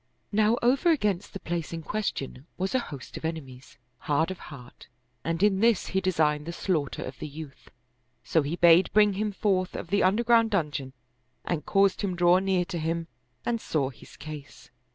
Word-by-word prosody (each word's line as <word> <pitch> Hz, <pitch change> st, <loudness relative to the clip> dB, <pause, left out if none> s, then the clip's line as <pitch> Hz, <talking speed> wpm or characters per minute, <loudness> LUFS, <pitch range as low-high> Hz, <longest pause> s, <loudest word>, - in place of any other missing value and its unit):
Now 215 Hz, +2 st, +3 dB
over 265 Hz, +8 st, +3 dB
against 210 Hz, -, +1 dB
the 195 Hz, -, -7 dB
place 170 Hz, -3 st, -4 dB
in 165 Hz, -1 st, -5 dB
question 155 Hz, -9 st, -4 dB
was 190 Hz, +1 st, -2 dB
a 260 Hz, -, +3 dB
host 140 Hz, -, -8 dB
of -, -, -9 dB
enemies, 135 Hz, -6 st, -6 dB, 0.2 s
hard 155 Hz, +4 st, 0 dB
of 185 Hz, -, -7 dB
heart, 125 Hz, -4 st, -12 dB, 0.4 s
and 165 Hz, +3 st, -1 dB
in 200 Hz, -2 st, +4 dB
this 230 Hz, -2 st, +3 dB
he 190 Hz, -, 0 dB
designed 155 Hz, -5 st, +1 dB
the -, -, -2 dB
slaughter 165 Hz, -5 st, -2 dB
of 130 Hz, -, -8 dB
the -, -, -5 dB
youth: 150 Hz, -1 st, -10 dB, 0.5 s
so 160 Hz, -, +2 dB
he 145 Hz, +4 st, -2 dB
bade 175 Hz, +1 st, +6 dB
bring 210 Hz, -1 st, +5 dB
him 210 Hz, +2 st, -1 dB
forth 190 Hz, -2 st, 0 dB
of 170 Hz, -, -6 dB
the 200 Hz, -, +3 dB
underground 230 Hz, +3 st, +4 dB
dungeon 150 Hz, -9 st, -2 dB, 0.5 s
and 165 Hz, -4 st, -2 dB
caused 195 Hz, -1 st, +3 dB
him 195 Hz, -3 st, -1 dB
draw 175 Hz, +1 st, +5 dB
near 190 Hz, -2 st, +1 dB
to 175 Hz, -2 st, -4 dB
him 165 Hz, +1 st, -2 dB, 0.4 s
and 235 Hz, -2 st, -1 dB
saw 140 Hz, -4 st, -1 dB
his 125 Hz, -, -16 dB
case. 145 Hz, -4 st, -10 dB
175 Hz, 185 wpm, -27 LUFS, 155-200 Hz, 0.5 s, bade